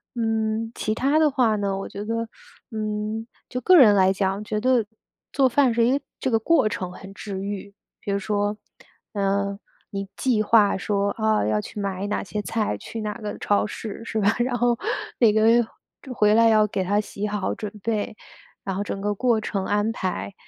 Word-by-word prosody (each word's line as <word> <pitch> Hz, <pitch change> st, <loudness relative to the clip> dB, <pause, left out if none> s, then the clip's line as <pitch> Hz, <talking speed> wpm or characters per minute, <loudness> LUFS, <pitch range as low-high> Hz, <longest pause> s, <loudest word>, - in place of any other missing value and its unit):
嗯， 225 Hz, -1 st, -1 dB
其 215 Hz, -, -1 dB
它 280 Hz, +5 st, +2 dB
的 310 Hz, -1 st, +5 dB
话 240 Hz, -6 st, +2 dB
呢， 200 Hz, -1 st, -1 dB
我 195 Hz, -, -5 dB
觉 200 Hz, -, -6 dB
得， 230 Hz, +1 st, -2 dB, 0.4 s
嗯， 215 Hz, 0 st, -3 dB, 0.2 s
就 250 Hz, 0 st, -4 dB
个 365 Hz, +8 st, +6 dB
人 215 Hz, -9 st, +8 dB
来 190 Hz, -1 st, +5 dB
讲， 195 Hz, +1 st, -1 dB
觉 215 Hz, 0 st, -2 dB
得 250 Hz, -2 st, +2 dB, 0.5 s
做 270 Hz, -2 st, +4 dB
饭 255 Hz, -1 st, +3 dB
是 230 Hz, 0 st, +3 dB
一 265 Hz, +3 st, +3 dB
个 285 Hz, -, -10 dB, 0.2 s
这 260 Hz, -, -1 dB
个 225 Hz, -, +3 dB
过 225 Hz, -1 st, +3 dB
程 185 Hz, -3 st, -3 dB
很 195 Hz, +2 st, -11 dB
治 200 Hz, -1 st, -6 dB
愈。 200 Hz, 0 st, -5 dB, 0.3 s
比 200 Hz, -, -3 dB
如 200 Hz, -, +1 dB
说， 205 Hz, 0 st, -1 dB, 0.6 s
嗯， 200 Hz, 0 st, 0 dB, 0.3 s
你 195 Hz, -1 st, -4 dB
计 235 Hz, -5 st, +2 dB
划 210 Hz, -2 st, +4 dB
说， 200 Hz, +2 st, -1 dB
哦， 220 Hz, -, +2 dB
要 105 Hz, -1 st, +1 dB
去 210 Hz, -, -8 dB
买 195 Hz, -1 st, -2 dB
哪 210 Hz, -, -1 dB
些 210 Hz, +2 st, -4 dB
菜， 215 Hz, -, -1 dB
去 225 Hz, -, -7 dB
哪 210 Hz, -1 st, -2 dB
个 210 Hz, -1 st, -5 dB
超 205 Hz, -, +1 dB
市， 215 Hz, +1 st, -7 dB
是 220 Hz, -1 st, -2 dB
吧， 205 Hz, +2 st, +3 dB
然 245 Hz, 0 st, +1 dB
后 240 Hz, -1 st, +2 dB, 0.4 s
每 230 Hz, -4 st, +6 dB
个 215 Hz, -, +2 dB, 0.7 s
回 210 Hz, -3 st, +4 dB
来 230 Hz, 0 st, +6 dB
要 215 Hz, -1 st, +4 dB
给 190 Hz, -2 st, -2 dB
它 205 Hz, +3 st, +1 dB
洗 205 Hz, 0 st, -4 dB
好 205 Hz, -2 st, -2 dB
准 210 Hz, -2 st, -5 dB
备， 215 Hz, -1 st, -2 dB, 0.5 s
然 195 Hz, -, -2 dB
后 200 Hz, -, -1 dB
整 200 Hz, -, -4 dB
个 205 Hz, +1 st, -1 dB
过 235 Hz, +2 st, +2 dB
程 200 Hz, -2 st, -3 dB
安 205 Hz, +2 st, +1 dB
排。 100 Hz, -, -3 dB
210 Hz, 210 characters per minute, -24 LUFS, 200-225 Hz, 0.7 s, 人